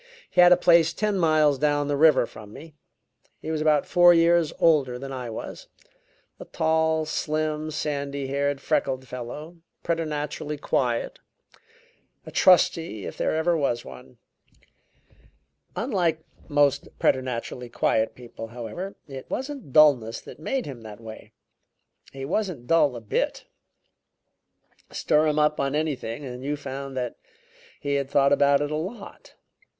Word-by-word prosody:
He 180 - +5
had 175 0 +7
a 180 - +7
place 170 -2 +4
ten 210 -2 -1
miles 155 -4 +3
down 145 -1 +1
the 145 - 0
river 150 -3 +5
from 105 -2 -12
me. 155 +7 -12 0.7
He 160 - -5
was 155 -1 -2
about 155 -2 +3
four 175 0 +6
years 165 -1 +3
older 140 -7 +3
than 135 +2 -7
I 125 -3 -5
was 110 - -8 0.7
a - - -8
tall, 160 -1 +1
slim, 155 0 -2
sandy 140 -2 -3
haired, 140 +1 -1
freckled 130 -1 -1
fellow, 125 +8 -8 0.3
preternaturally 150 -2 -3
quiet; 125 -4 -1 1.1
a - - -9
trusty, 165 - +3
if - - -6
there - - -1
ever 165 +2 +1
was 135 -6 -1
one. 65 0 -12 1.6
Unlike 175 - 0 0.2
most 145 -2 +2
preternaturally 125 -1 -1
quiet 110 -1 0
people, 120 -2 -9
however, 120 - -7
it 135 -2 -9
wasn't 270 - -5
dulness 130 -7 +4
that - - -12
made 265 +11 -2
him 130 -5 -8
that 110 -1 -10
way; 110 -1 -11 0.8
he 135 0 -7
wasn't 175 - -2
dull 145 -2 +3
a 120 - -7
bit. 105 - -2 1.4
Stir 155 +1 +1
him 150 0 0
up 150 0 +2
on 140 +1 0
anything 145 -4 -3
and 125 0 -7
you 145 +2 -2
found 135 -1 -7
that 125 -1 -3 0.6
he 145 0 -2
had 140 -1 -1
thought 140 0 +3
about 140 0 +4
it 145 0 -2
a - - -1
lot. 195 +7 -7
145 Hz, 145 wpm, -25 LUFS, 130-160 Hz, 1.6 s, had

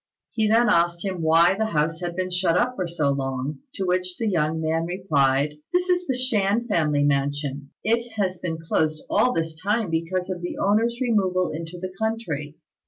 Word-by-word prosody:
He 220 -2 +1
then 225 +2 +4
asked 170 -2 +2
him 185 -3 -3
why 165 +3 +5
the 220 +2 -1
house 160 +2 +1
had 175 -1 -4
been 185 0 -2
shut 180 -1 +2
up 250 +4 +1
for 185 -5 -2
so 155 -4 0
long; 135 +1 -3 0.2
to 195 - -2
which 180 0 -1
the 225 - -1
young 160 -4 +1
man 160 +1 0
replied, 150 -5 +1
"This 360 +1 +1
is 360 0 +1
the 260 -2 0
Shan 230 -2 +2
family 150 -7 +2
mansion. 140 0 -1
It 230 +1 0
has 190 -4 -1
been 170 -2 -3
closed 155 -1 -1
all 250 - +3
this 165 -5 -2
time 210 -1 0
because 180 +3 -1
of 180 -1 -5
the 175 - -5
owner's 225 +4 +2
removal 190 -7 +1
into 165 +2 -6
the 185 +1 -6
country. 165 -10 -3
180 Hz, 190 wpm, -24 LUFS, 160-210 Hz, 0.2 s, why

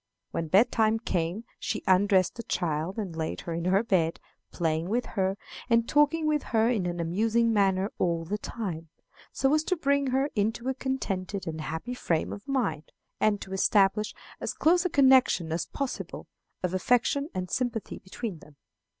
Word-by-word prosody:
When 165 - -2
bed 200 +9 +4
time 220 -1 +3
came 180 -2 -2 0.2
she 215 - -3
undressed 190 0 +4
the 235 - -6
child 170 -3 -2
and 195 -7 -4
laid 160 -1 -3
her 170 - -5
in 170 +1 -3
her 190 +4 +3
bed, 170 -7 +1 0.3
playing 160 +1 -1
with 240 +3 0
her, 195 -1 0 0.3
and 230 0 +3
talking 295 +2 +3
with 305 -1 +2
her 225 -1 +1
in 210 -7 0
an 175 0 -3
amusing 225 +7 +1
manner 195 -1 +2
all 170 -2 0
the 205 +5 -3
time, 170 -10 -5 0.4
so 270 +1 +1
as 305 0 +3
to 370 - +1
bring 280 -3 +1
her 270 +3 +1
into 225 +4 -1
a - - +1
contented 200 -8 -3
and 160 -1 -4
happy 160 +11 -4
frame 165 -9 -1
of 200 - -10
mind, 235 - -1 0.3
and 210 -2 +2
to 190 - -7
establish 200 +2 +2 0.2
as - - -3
close 350 +3 +3
a - - +2
connection 260 - +4
as 165 +1 -2
possible 275 -2 -5 0.4
of 180 0 -1
affection 250 - +1
and 180 -1 -3
sympathy 245 -4 -2
between 190 -1 -6
them. 150 -1 -17
205 Hz, 175 wpm, -28 LUFS, 175-245 Hz, 0.4 s, bed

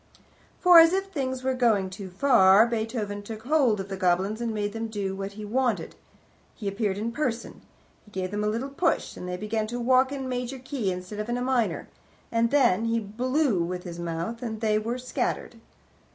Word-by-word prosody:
For, 355 -2 +8
as 330 +1 +7
if 390 0 -1
things 260 -5 -3
were 260 0 +1
going 220 -7 +2
too 190 0 -7
far, 195 -1 +5
Beethoven 220 -3 -3
took 220 +1 -8
hold 260 -6 +2
of 195 - -4
the 195 - -4
goblins 190 +4 +1
and 235 -1 -1
made 205 -1 -2
them 225 0 -3
do 200 -3 -3
what 195 +1 -5
he 210 +1 -7
wanted. 240 0 -1 0.6
He 210 - -6
appeared 200 -1 -1
in 225 +3 -2
person. 235 -3 -3 0.4
He - - -18
gave 185 -2 -4
them 210 0 -2
a - - +1
little 230 +6 -2
push, 330 +4 0
and 180 - -7
they 180 - -3
began 215 +2 -2
to 240 +2 -4
walk 255 +2 +3
in 270 -2 -4
major 250 +1 -3
key 255 -6 -3
instead 180 +3 -6
of 210 +2 -4
in 240 - 0
a - - -3
minor, 250 -3 0 0.4
and 230 0 +2
then 240 -7 +3
he 230 0 +1
blew 245 - 0
with 180 +1 -4
his 170 -1 -7
mouth 170 +7 -4
and 220 -3 -4
they 215 -1 +2
were 230 +3 -3
scattered! 255 0 -3
225 Hz, 205 wpm, -26 LUFS, 200-255 Hz, 0.6 s, For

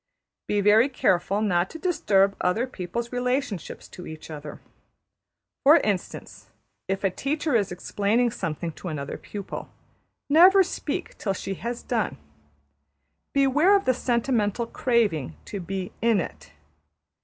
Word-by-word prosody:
Be 205 -1 +1
very 215 +6 +5
careful 195 -4 +1
not 180 -3 +1
to - - -8
disturb 200 - +2
other 215 +7 +1
people's 235 0 -5
relationships 250 - -2
to 180 - -10
each 155 0 -9
other. 150 -1 -8 1.0
For 300 +4 +8
instance, 205 - -3 0.4
if 195 +1 -2
a 195 - +2
teacher 295 - -2
is 200 -5 +1
explaining 210 +6 0
something 165 -5 -4
to 180 - -9
another 145 -4 -4
pupil, 200 -2 -7 0.6
never 365 +6 +7
speak - - -5
till 195 - -1
she 195 +1 -4
has 235 +5 -5
done. 230 -3 -1 1.1
Beware 280 +8 +4
of 395 - +1
the 255 - +4
sentimental 235 -3 0
craving 210 - 0
to 200 - -5
be 185 +1 -4
``in 230 -2 +3
it.'' 75 - -6
210 Hz, 130 wpm, -25 LUFS, 185-250 Hz, 1.1 s, For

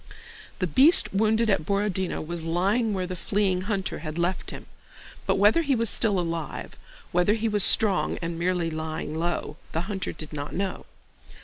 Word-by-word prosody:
The 185 - 0
beast 235 - +5
wounded 220 +2 +2
at 195 - +1
Borodinó 195 -2 -1
was 170 0 -4
lying 200 +8 +1
where 185 -1 -1
the 185 0 -5
fleeing 190 0 0
hunter 195 -3 -2
had 155 0 -6
left 175 +2 -1
him; - - -8 0.6
but - - +3
whether 205 +11 +4
he 285 -4 +1
was 230 -2 0
still 205 -5 +2
alive, 165 -3 -4 0.4
whether 180 +4 +3
he 225 0 -1
was 210 -3 +2
strong 205 -2 +4
and 170 0 -4
merely 175 -1 0
lying 155 -1 -4
low, 165 -2 -3 0.2
the 165 - 0
hunter 195 0 -4
did 155 -1 -9
not 145 0 -5
know. 195 +1 -3
185 Hz, 175 wpm, -26 LUFS, 170-210 Hz, 0.6 s, beast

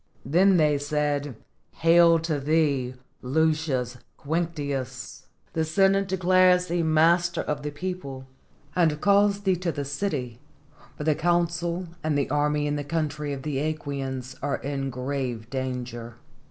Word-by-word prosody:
Then 180 +7 +4
they 150 -3 +3
said, 145 -2 -1 0.4
"Hail 165 0 +5
to 160 -3 -1
thee, 140 -4 +1 0.3
Lucius 140 -3 0 0.2
Quinctius! 145 -4 -4 0.3
the 160 - +1
Senate 195 +4 +2
declares 185 -1 +4
thee 175 -1 -1
master 165 +2 +3
of 150 -1 -3
the 150 - -3
people, 145 -5 -6 0.5
and 160 -4 +2
calls 200 +1 +3
thee 190 -3 +1
to 175 -1 -1
the 145 -2 -4
city, 140 - -3 0.6
for - - -4
the 155 0 +3
consul 170 +2 0 0.2
and 155 -2 +1
the 140 - -1
army 150 0 +1
in 145 0 -1
the 145 - -3
country 150 -1 -2
of 135 -1 -5
the 150 -3 -2 0.2
^quians 135 -3 -5
are 145 0 -1
in 135 -1 -3
great 125 -3 -3
danger." 125 -3 -4
150 Hz, 140 wpm, -26 LUFS, 140-170 Hz, 0.6 s, Hail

